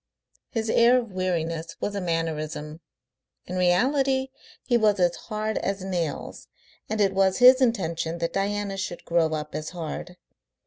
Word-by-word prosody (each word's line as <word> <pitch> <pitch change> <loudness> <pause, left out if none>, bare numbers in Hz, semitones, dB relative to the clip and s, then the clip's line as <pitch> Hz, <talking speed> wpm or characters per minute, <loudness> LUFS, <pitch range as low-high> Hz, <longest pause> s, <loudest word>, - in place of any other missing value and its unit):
His 225 -2 -2
air 235 +3 +5
of 235 -4 -3
weariness 165 -3 -2
was 205 - -2
a 200 - -3
mannerism. 160 -2 -3 0.6
In 180 - -6
reality 265 +9 +2 0.4
he 245 - +2
was 215 -4 +3
as 175 -1 +3
hard 215 -1 -3
as 195 -1 -2
nails, 175 -5 -4 0.4
and 220 - -2
it 195 -2 +3
was 190 -1 +2
his 255 +1 +8
intention 170 -9 0
that 170 0 -2
Diana 200 0 -1
should 180 -2 -5
grow 165 -2 +2
up 150 0 -6
as 155 0 -4
hard. 175 +1 -6
185 Hz, 150 wpm, -25 LUFS, 165-215 Hz, 0.6 s, his